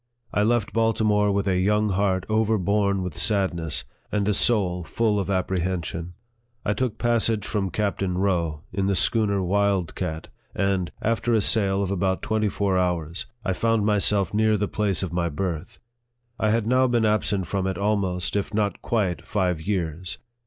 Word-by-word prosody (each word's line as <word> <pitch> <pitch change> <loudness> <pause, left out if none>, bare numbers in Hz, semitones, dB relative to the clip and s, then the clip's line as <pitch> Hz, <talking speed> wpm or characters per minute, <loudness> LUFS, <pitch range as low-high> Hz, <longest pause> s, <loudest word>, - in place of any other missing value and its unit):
I 105 - +2
left 110 0 +1
Baltimore 110 -2 +2
with 100 0 0
a 90 -1 +2
young 105 +3 +2
heart 95 -1 +1
overborne 105 -2 +1
with 90 -5 -5
sadness, 85 - +1 0.3
and 105 -1 0
a 105 - +3
soul 95 -5 +2
full 105 +4 0
of 100 - -3
apprehen 95 -2 -1
sion. 85 +1 -6 0.5
I 105 - +2
took 115 0 -2
passage 115 -3 0
with 95 -4 0
Captain 100 -2 -1
Rowe, 85 -6 0
in 95 +1 0
the 100 - +1
schooner 100 0 +2
Wild 100 -2 +1
Cat, 80 -4 -4 0.3
and, 95 -3 0
after 115 +1 +1
a - - +4
sail 100 -1 +2
of 95 - -2
about 95 0 0
twenty 110 -1 +1
four 95 -2 0
hours, 85 -2 -2 0.2
I 95 - +1
found 115 +1 +1
myself 105 -2 +2
near 110 0 +3
the 105 0 -1
place 100 -3 0
of 90 -3 -4
my 85 -1 0
birth. 85 +1 -4 0.6
I 110 - +2
had 110 0 +1
now 130 +3 +3
been 120 -2 +2
absent 105 -3 +1
from 95 +2 -2
it 95 - -2
almost, 100 -3 0
if 100 +1 -2
not 105 -1 0
quite, 100 -7 0
five 90 -6 -1
years. 90 -1 -3
100 Hz, 175 wpm, -24 LUFS, 90-105 Hz, 0.6 s, a